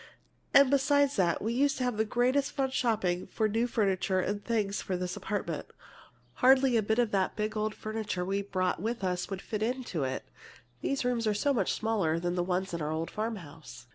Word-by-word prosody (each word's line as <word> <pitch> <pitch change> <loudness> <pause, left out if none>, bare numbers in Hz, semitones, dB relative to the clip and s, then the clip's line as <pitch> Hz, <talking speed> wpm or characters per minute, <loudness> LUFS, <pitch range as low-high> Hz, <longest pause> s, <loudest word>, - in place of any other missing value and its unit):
And 275 -1 +6
beside 285 0 +4
that, 180 -9 +1
we 225 +2 0
used 275 +3 +2
to 255 - -1
have 250 -2 0
the 220 - +2
greatest 255 +5 +1
fun 270 -2 0
shopping 210 -9 0
for 220 - 0
new 225 +3 +1
furniture 195 -5 +1
and 205 +2 -2
things 210 -4 -1
for 185 -3 -2
this 180 0 -3
apartment. 170 -7 -3 0.7
Hardly 260 0 +5
a 225 - +4
bit 220 +2 0
of 240 -3 +2
that 190 -2 +1
big 215 +1 -2
old 215 0 -1
furniture 215 -4 -3
we 195 +2 0
brought 185 -3 -1
with 225 0 -3
us 180 -1 -1
would 195 -1 -5
fit 215 -1 -4
into 235 - -2
it, 130 0 -3 0.5
these 275 -2 -1
rooms 240 -2 0
are 210 - +2
so 285 +7 +2
much 245 - +1
smaller 200 -8 0
than 175 +1 -1
the 180 - 0
ones 180 +1 -1
in 170 - -3
our 150 +1 -2
old 160 +1 -3
farm 220 +1 -2
house. 150 - -11
215 Hz, 210 wpm, -30 LUFS, 185-245 Hz, 0.7 s, And